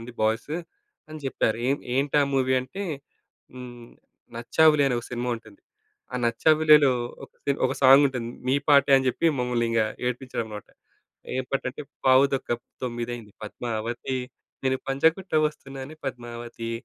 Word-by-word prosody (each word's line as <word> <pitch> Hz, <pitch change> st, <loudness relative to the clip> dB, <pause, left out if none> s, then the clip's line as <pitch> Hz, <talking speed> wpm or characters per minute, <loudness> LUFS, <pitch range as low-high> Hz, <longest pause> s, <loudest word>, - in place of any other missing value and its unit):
ఉంది 115 Hz, +1 st, -9 dB
బాయ్స్ 110 Hz, +6 st, 0 dB, 0.6 s
అని 155 Hz, 0 st, -8 dB
జెప్పారు. 115 Hz, -4 st, 0 dB
ఏన్ 140 Hz, +1 st, +1 dB
ఏంటా 145 Hz, +2 st, +2 dB
మూవీ 130 Hz, -1 st, +2 dB
అంటే, 130 Hz, +11 st, -7 dB, 0.7 s
హ్మ్, 120 Hz, -2 st, -10 dB, 0.5 s
'నచ్చావులే' 150 Hz, +5 st, +4 dB
అని 125 Hz, -, 0 dB
ఓ -, -, -16 dB
సినిమా 125 Hz, 0 st, -3 dB
ఉంటుంది. 110 Hz, -3 st, -16 dB, 0.5 s
ఆ -, -, -5 dB
'నచ్చావులే‌'లో 150 Hz, +3 st, +5 dB, 0.3 s
ఒక -, -, -19 dB
సి 140 Hz, -, +2 dB
ఒక -, -, -2 dB
సాంగుంటుంది. 130 Hz, -3 st, +5 dB, 0.2 s
మీ 130 Hz, -, +3 dB
పాటే 140 Hz, -1 st, +5 dB
అని 130 Hz, 0 st, +1 dB
చెప్పి 130 Hz, -, 0 dB
మమ్మల్నింక 120 Hz, -2 st, +1 dB, 0.2 s
ఏడిపిచ్చాడనమాట. 120 Hz, -4 st, -4 dB, 0.7 s
ఏం 130 Hz, -, -1 dB
పాటంటే 135 Hz, +1 st, -3 dB, 0.2 s
పావు 130 Hz, +1 st, +7 dB
తొక్క 135 Hz, -, -4 dB, 0.3 s
తొమ్మిదయింది 120 Hz, -3 st, -5 dB
పద్మావతి, 115 Hz, +3 st, -4 dB, 0.5 s
నేను 130 Hz, 0 st, +2 dB
పంజగుట్ట 160 Hz, +8 st, +1 dB, 0.2 s
ఒస్తున్నానే 135 Hz, 0 st, -10 dB
పద్మావతి, 120 Hz, -2 st, -6 dB
130 Hz, 130 wpm, -25 LUFS, 120-140 Hz, 0.7 s, పావు